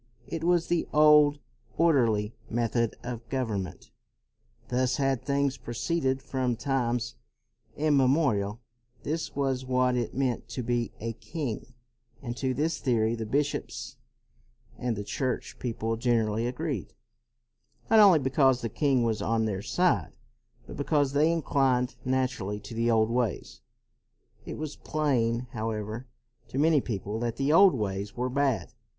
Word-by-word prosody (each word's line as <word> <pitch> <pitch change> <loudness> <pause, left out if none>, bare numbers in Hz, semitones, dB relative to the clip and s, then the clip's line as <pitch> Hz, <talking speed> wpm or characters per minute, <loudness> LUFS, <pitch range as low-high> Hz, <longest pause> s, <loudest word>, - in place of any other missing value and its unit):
It 165 -1 -5
was 175 -1 +3
the 175 -1 0
old, 150 -1 +6 0.4
orderly 115 -10 +3 0.2
method 115 0 0
of 120 -1 -6
government; 110 -9 -3 0.8
thus 125 0 +1
had 135 -3 +1
things 140 -1 0
proceeded 130 +2 -1
from 130 -3 -1
times 120 -3 -1 0.6
immemorial; 135 -7 +2 0.4
this 160 +2 -3
was 135 -2 0
what 125 -1 +1
it 120 -2 -2
meant 130 -3 -1
to 120 +2 -4
be 120 -1 -1
a 115 +1 -3
king. 120 +1 -5 0.5
And 120 -2 -4
to 130 - -3
CROMWELL 130 - 0
241 145 - 0
this 160 0 -1
theory 115 -4 +1
the 110 -1 -6
bishops 145 +1 -2 0.8
and 120 -2 -1
the 105 - -4
church 130 +5 -3
people 115 -2 -2
generally 115 -2 +1
agreed; 130 - -4 1.0
not 220 - +7
only 200 -5 +8
because 135 -2 +3
the 115 - -2
king 135 +1 +2
was 115 -2 0
on 115 0 +1
their 100 -3 -2
side, 120 - +1 0.5
but - - -9
because 145 -1 +1
they 150 +3 +4
inclined 135 -6 +1
naturally 125 -6 -1
to 100 +3 -9
the 115 +1 0
old 110 -1 +3
ways. 120 -5 -2 0.9
It - - -5
was 155 -1 -5
plain, 120 -7 0
however, 110 +1 -4 0.4
to 120 - -6
many 155 0 +4
people 105 -2 -4
that 120 -1 -2
the 140 +4 +1
old 190 0 +7
ways 100 -2 -3
were 125 +1 -1
bad. 130 -9 0
125 Hz, 145 wpm, -28 LUFS, 115-140 Hz, 1.0 s, only